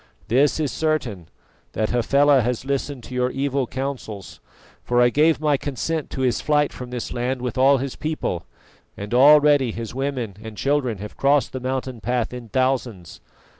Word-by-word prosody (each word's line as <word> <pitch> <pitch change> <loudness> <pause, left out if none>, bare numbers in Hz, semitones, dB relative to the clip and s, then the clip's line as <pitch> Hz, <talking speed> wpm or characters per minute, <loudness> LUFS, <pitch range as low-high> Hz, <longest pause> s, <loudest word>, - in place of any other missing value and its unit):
This 140 +7 +3
is 150 -3 0
certain, 125 - -2 0.4
that 110 - -1
Hafela 140 +3 +4
has 125 +2 -2
listened 140 -1 -3
to 130 - -10
your 125 0 +1
evil 135 -1 -1
counsels, 130 -7 -6 0.4
for 120 0 +1
I 120 0 +5
gave 155 +5 +3
my 150 -2 +2
consent 145 +3 -3
to 130 - -5
his 125 -2 +1
flight 150 -1 +1
from 125 -1 -8
this 125 -1 -5
land 125 +2 -2
with 125 -1 -3
all 135 +1 +5
his 135 0 -4
people, 150 - -3 0.5
and 100 +3 -6
already 145 -1 +6
his 115 0 -6
women 130 -6 -3
and 110 -1 -9
children 135 -6 0
have 105 +2 -9
crossed 140 0 +2
the 130 - -3
mountain 130 -2 -4
path 120 +2 -1
in 120 -2 -8
thousands. 130 -8 -2
130 Hz, 170 wpm, -22 LUFS, 120-140 Hz, 0.5 s, already